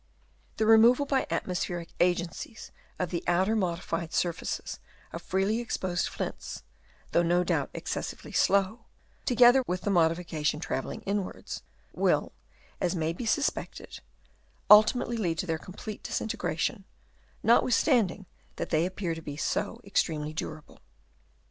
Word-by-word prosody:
The 220 - +2
re 220 0 +7
moval 250 +5 +5
by 270 -2 +1
atmospheric 175 -2 -2
agencies 175 +5 -1 0.3
of 180 -2 -2
the 170 - -2
outer 185 +5 +2
modified 170 -4 -2
surfaces 175 -2 -2 0.3
of - - -5
freely 195 +4 0
exposed 185 -6 -1
flints, - - -5 0.5
though 170 - +4
no 175 +1 +2
doubt - - 0
excessively - - -5
slow, 200 +4 +2 0.4
to 250 - +1
gether 245 +3 +7
with 180 0 -2
the 205 - -1
modification 165 -3 +1
travelling 135 -5 -4
inwards, 200 -1 -4 0.3
will, - - +1 0.5
as 180 +1 0
may 165 -1 0
be 225 +7 -5
suspected, 285 +6 -2 0.7
ultimately 225 +3 +6
lead 170 -7 -1
to - - -1
their 165 -3 -1
complete 205 +4 -8
disintegration, 195 -2 -2 0.6
not 235 +2 +6
withstanding 230 - +2 0.3
that - - -5
they 160 +1 +3
appear 185 -2 -3
to 165 - -7
be 145 -2 -7
so - - -2
extremely 155 -6 -1
durable. 155 -1 -7
185 Hz, 135 wpm, -28 LUFS, 170-220 Hz, 0.7 s, re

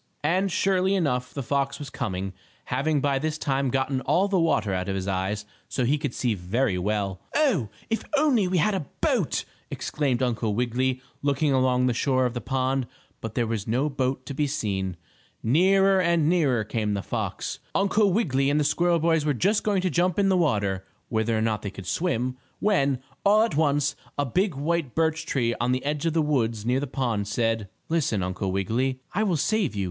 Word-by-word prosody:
And, 185 +5 +1
surely 190 +1 +2
enough 125 -8 0
the 140 - -4
fox 140 +2 0
was 145 -2 -8
coming, 95 -7 -3 0.3
having 140 +3 0
by 140 -1 +1
this 155 +2 -2
time 135 -3 0
gotten 135 +1 0
all 190 +8 +2
the 195 -2 +1
water 110 - +1
out 95 +1 -2
of 95 - -1
his 95 0 -3
eyes, 100 +2 -1 0.2
so 130 - 0
he 145 +5 +2
could 145 -4 -3
see 120 -3 0
very 100 +4 0
well. 100 -1 -1
"Oh, 225 - +2 0.2
if 225 - -1
we - - -16
only 230 -12 +3
had 210 +6 +3
a 180 -8 -3
boat!" - - +1 0.2
exclaimed 135 -4 -1
Uncle 115 -4 0
Wiggily, 125 +2 0 0.2
looking 140 0 +1
along 130 -1 +3
the 125 - +2
shore 130 +1 +1
of 125 - -1
the 120 - -4
pond, 130 +1 0 0.3
but 115 -1 -6
there 120 - +1
was 110 -2 -3
no 130 +7 +1
boat 130 -1 -1
to 140 - -5
be 145 +2 0
seen. 100 - -2 0.5
Nearer 190 +9 +4
and 170 -3 +2
nearer 145 -10 +2
came 105 -1 -1
the 100 - -3
fox! - - -3 0.2
Uncle 200 +1 +3
Wiggily 140 - +1
and 145 +1 +2
the - - +2
squirrel 170 +4 +2
boys 160 -1 +2
were 150 -2 +1
just 200 - +2
going 200 -3 +1
to 185 - +1
jump 175 0 +1
in 200 -1 +3
the 190 - +3
water, 100 - +1 0.3
whether 110 0 +1
or - - 0
not 110 -1 0
they 100 - -4
could 100 -1 -10
swim, 130 - -1 0.2
when, 140 -11 +2 0.3
all 210 +2 +5
at 230 - -1
once, 145 -1 +2 0.2
a 145 - +1
big 180 - 0
white 150 -1 -1
birch 160 0 0
tree 120 -3 +1
on 120 +1 +2
the 130 +2 -1
edge 150 +2 -1
of 165 - 0
the 160 -1 +2
woods 115 -7 0
near 125 +2 +2
the 145 - -3
pond, 120 -6 -1
said: 115 -1 0 0.2
"Listen, 140 - 0
Uncle 95 +1 -2
Wiggily 110 +8 0
and 130 -1 -6
I 195 - +1
will 190 -6 +1
save 195 - 0
you. - - -3
135 Hz, 205 wpm, -26 LUFS, 115-165 Hz, 0.5 s, all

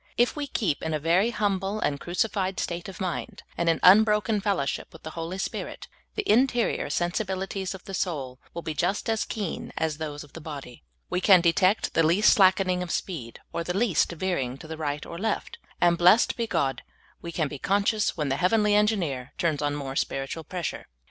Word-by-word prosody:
If 240 +1 +3
we 295 -1 -3
keep 200 - -1
in 160 -1 -1
a - - -1
very 175 +8 +3
humble 200 -2 -1
and 140 -7 -1
crucified 190 +2 -1
vState 170 0 -3
of 190 - -10
mind, 180 -3 -4
and 170 0 +1
in 165 - +2
unbroken 210 +1 +5
fellowship 195 -9 -1
with 160 - -14
the 160 - -6
Holy 165 +3 -5
Spirit, 195 - -5 0.3
the 420 -2 -2
interior 245 0 +2
sensibili 190 +2 -1
ties 190 -1 -4
of 185 - -12
the 195 - -8
soul 140 -9 -3 0.2
will 170 - -5
be 160 - -3
just 195 +7 -1
as 220 - 0
keen 205 -6 -4
as 160 -1 -1
those 150 -1 -5
of 145 - -17
the 165 - -9
body. 140 - -8 0.3
We 180 - 0
can 190 -1 +7
detect 185 +4 +2
the 165 - +3
least 170 +6 +5
slackening 185 -2 +4
of 180 - -4
speed, 150 -11 -4
or 170 - -2
the 180 +2 -2
least 200 -9 +2
veering 155 -8 -2
to 155 - -11
the 160 - -5
right 150 -2 -3
or 170 - -7
left; 220 +1 -2 0.2
and, 170 -1 +3
blessed 180 +7 +5
be 235 -2 -2
God, 135 - 0 0.4
we 170 - -6
can 160 -2 0
be 140 -1 -7
conscious 205 - +1
when 150 -3 -1
the 135 - 0
hea^^enly 210 +5 +3
Engineer 190 - +1
turns 160 -4 0
on 145 0 0
more 135 -2 -5
spiritual 135 +4 -2
pressure. 175 0 -5
175 Hz, 200 wpm, -26 LUFS, 155-200 Hz, 0.4 s, can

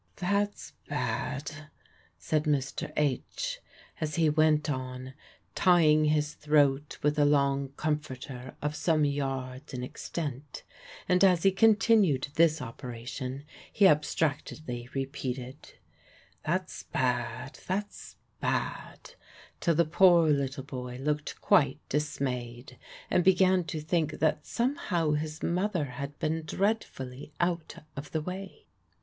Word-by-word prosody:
"That's 200 +3 -1 0.2
bad," 150 +2 -3 0.5
said 150 - 0
Mr. 145 +1 -1
H., 325 - -1 0.4
as 155 -2 -2
he 160 -2 +3
went 155 0 +3
on, 130 -2 -4 0.4
tying 155 -4 +5
his 150 0 +1
throat 145 -1 +2
with 150 +1 +2
a - - +6
long 140 -1 +2
comforter 130 -4 -4
of 150 +1 -1
some 155 -3 +2
yards 135 -1 -3
in 125 - -4
extent; 140 0 -5 0.4
and 180 +1 +3
as 180 -3 +5
he 195 - +6
continued 210 - +4
this 160 -3 +3
operation 125 +2 -6 0.3
he 200 - +5
abstractedly 150 -5 0
repeated, 135 0 -5 0.7
"That's 185 +3 -2
bad, 125 +1 -2
that's 205 +3 -4 0.2
bad," - - -3 0.5
till 170 - +2
the 170 +2 +4
poor 170 0 +5
little 140 -1 0
boy 125 -2 -6
looked 150 +1 -2
quite 150 -10 +4
dismayed, 125 -4 -3 0.3
and 180 - +4
began 185 -1 +4
to 155 0 -4
think 155 0 0
that 155 -1 0
somehow 205 - 0
his 155 +1 -2
mother 180 -2 0
had 140 +2 -6
been 160 +1 -1
dreadfully 150 - -2
out 170 -2 -1 0.2
of 140 +1 -7
the 160 - 0
way. 195 - -7
150 Hz, 120 wpm, -29 LUFS, 135-170 Hz, 0.7 s, a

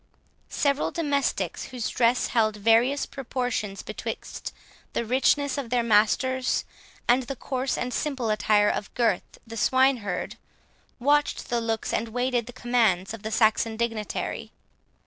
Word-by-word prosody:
Several 280 0 +1
domestics, 285 -4 -1
whose 250 -4 -4
dress 240 +1 +2
held 215 -3 +2
various 230 +6 +3
proportions 245 -6 -3
betwixt - - -6 0.4
the 235 - -1
richness 270 +4 +2
of 255 -4 -5
their 245 0 +2
master's, 245 +4 +2 0.4
and 245 +2 +5
the 260 +2 -5
coarse 260 +1 -2
and 250 0 -3
simple 265 -7 -1
attire 210 -1 +3
of 205 - -4
Gurth 235 -3 0
the 225 0 -8
swine 260 +4 +4
herd, 200 -5 -4 0.6
watched 290 +3 +1
the 240 -1 0
looks 225 -1 -2
and 230 - 0
waited 245 0 -1
the - - -7
commands 225 -6 +1
of 225 - -8
the 220 - -4
Saxon 220 0 +2
dignitary. 225 -2 -3
240 Hz, 140 wpm, -26 LUFS, 220-260 Hz, 0.6 s, and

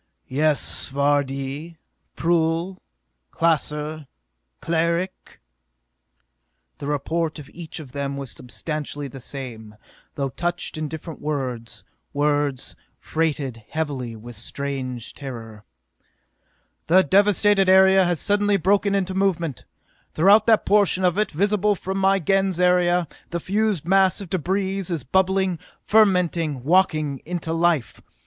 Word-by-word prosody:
"Yes, 150 +2 +1
Vardee? 140 +2 -1 0.4
Prull? 170 +2 0 0.5
Klaser? 155 -2 -1 0.5
Cleric?" 170 +3 -2 1.4
The 140 - -5
report 155 +3 -1
of 145 -3 -10
each 165 -2 -8
of 140 -5 -10
them 140 0 -3
was 135 -4 -5
substantially 145 - -5
the 135 0 -10
same, 120 -5 -8 0.4
though 135 -2 -2
couched 175 +5 -3
in 155 0 -3
different 160 +1 -8
words, 130 -6 -4 0.3
words 145 -2 0 0.2
freighted 145 -8 -2
heavily 140 -7 -3
with 120 +2 -10
strange 130 +1 -5
terror. 115 -6 -9 1.2
"The 185 +3 +6
devasted 200 0 +3
area 190 0 +6
has 175 -3 0
suddenly 205 0 +2
broken 200 +2 +2
into 190 -1 -1
movement! 170 - -1 0.5
Throughout 200 +7 +5
that 225 -2 +4
portion 200 -2 +3
of 180 +2 +2
it 215 - +1
visible 205 +4 +1
from 190 +1 -4
my 195 0 +4
Gens 195 0 +1
area, 180 -1 +3 0.2
the 170 - -2
fused 200 -2 0
mass 190 -1 +3
of 195 -4 -9
debris 190 +2 -1
is 170 -7 -3
bubbling, 190 +3 +1 0.3
fermenting, 175 - +2
walking 155 -4 +2
into 165 -1 -4
life! 165 -6 0
165 Hz, 115 wpm, -23 LUFS, 140-190 Hz, 1.4 s, The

